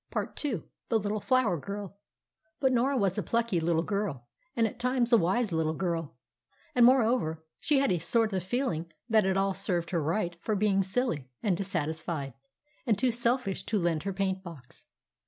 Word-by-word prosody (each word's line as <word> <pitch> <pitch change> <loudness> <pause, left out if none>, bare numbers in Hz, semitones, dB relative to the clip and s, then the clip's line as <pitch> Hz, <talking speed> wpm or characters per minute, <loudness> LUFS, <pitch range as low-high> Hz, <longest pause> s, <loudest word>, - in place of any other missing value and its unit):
PART - - -3
II 240 - -2 0.3
THE 230 - +3
LITTLE 210 0 -1
FLOWER 230 - +2
GIRL 200 +3 -6 0.6
But 265 -2 +3
Norah 260 +3 +2
was 195 -5 +1
a - - +1
plucky 230 -6 0
little 165 0 +1
girl, 200 - -2 0.3
and 230 - +3
at 225 +2 -4
times 250 -1 +1
a - - +9
wise 195 +5 +1
little 160 -1 0
girl. 165 -5 -2 0.6
And, 240 -1 +7
moreover, 225 -11 +2 0.2
she 295 - +2
had 275 -4 +3
a 180 - +1
sort 220 +6 +2
of 190 - 0
feeling 180 - -2 0.2
that 215 -3 +3
it 190 0 +1
all 195 0 +2
served 180 -3 -1
her 170 -3 +1
right 170 +3 -1
for 215 - -1
being 200 -1 +2
silly, 190 - -1
and 200 -5 +2
dissatisfied, 160 -6 -3 0.5
and 220 -4 +3
too 255 +3 +2
selfish 240 -3 0
to 220 - +1
lend 170 -4 +1
her 200 - -3
paint 190 0 -1
box. 130 - -12
195 Hz, 185 wpm, -29 LUFS, 170-235 Hz, 0.6 s, a